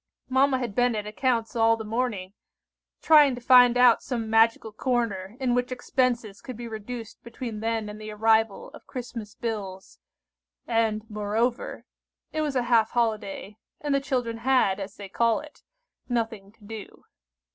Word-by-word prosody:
Mamma 265 +1 +3
had 245 -5 -4
been 245 +1 +2
at 210 -1 -3
accounts 230 +1 -1
all 225 0 +4
the 220 - -6
morning, 215 -4 -2 0.7
trying 295 -4 +6
to - - -8
find 245 0 +6
out 245 -2 +6
some 230 -4 -4
magical 225 0 +3
corner 220 -4 -2
in 255 -2 +1
which 245 +1 0
expenses 245 -4 -1
could 255 -4 -8
be 240 0 -6
reduced 225 +1 -7
between 235 -2 -6
then 225 -1 -1
and 210 +1 -8
the 215 - -7
arrival 220 0 +1
of - - -15
Christmas 230 -4 -7
bills; 195 - -5 0.7
and, 225 -2 0
moreover, 215 +4 -2 0.5
it 310 - -1
was 295 -3 -2
a 250 - +2
half 230 -2 +3
holiday, 215 -3 -2 0.2
and 290 -1 -1
the 275 - +2
children 250 -4 -2
had, 230 -5 +2
as 195 +1 -6
they 200 - -8
call 230 +3 +1
it, 300 -1 -13 0.5
nothing 225 -4 -2
to 225 - -24
do. 215 0 -10
230 Hz, 160 wpm, -26 LUFS, 215-250 Hz, 0.7 s, trying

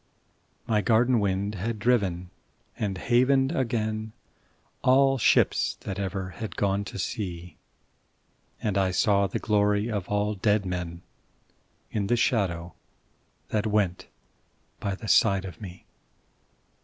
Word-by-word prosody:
My 105 -2 +1
garden 120 +2 +3
wind 100 0 -1
had 110 +4 -3
driven 100 -6 0 0.4
and 100 -3 -2
havened 130 +5 +2
again 110 -3 -2 0.7
All 135 +1 +4
ships 105 - +3
that 95 -1 -5
ever 95 -1 -3
had 110 +3 -7
gone 100 0 0
to - - -7
sea, 90 -5 -5 1.0
And 100 -2 0
I 95 -1 +2
saw 100 +2 +2
the 95 - -3
glory 105 +1 +1
of 100 -4 -3
all 105 +1 0
dead 105 0 +1
men 90 -2 -4 0.9
In 100 -3 -1
the 120 - +3
shadow 90 -8 0 0.8
that 110 0 0
went 105 -4 0 0.7
by 100 -1 -2
the 110 - -9
side 95 -1 +4
of 90 -1 -9
me. 90 -3 -10
105 Hz, 125 wpm, -26 LUFS, 95-110 Hz, 1.0 s, All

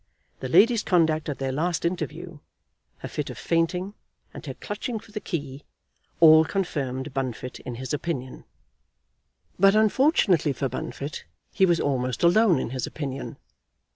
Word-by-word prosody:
The 130 - -5
lady's 230 - +5
conduct 160 -5 +1
at 145 - -3
their 135 -1 -2
last 165 +5 -1
interview, 170 -1 -4 0.6
her - - -7
fit - - -4
of - - -8
fainting, 180 +4 -1 0.4
and - - -9
her 135 - -5
clutching 220 +3 -5
for 215 - -17
the 210 - -4
key, 145 -8 -5 0.6
all 160 -1 +8
confirmed 145 -7 -3
Bunfit 130 -2 -4
in 125 - -7
his 130 +4 -5
opinion. 140 -4 -4 1.1
But 195 +2 +6
unfortunately 215 - +3
for 135 - -2
Bunfit 140 +4 -6 0.3
he 190 - +3
was 170 -1 +2
almost 130 -2 -1
alone 180 +1 +5
in 125 - -3
his 130 -2 -3
opinion. 140 -3 -6
160 Hz, 145 wpm, -25 LUFS, 135-185 Hz, 1.1 s, all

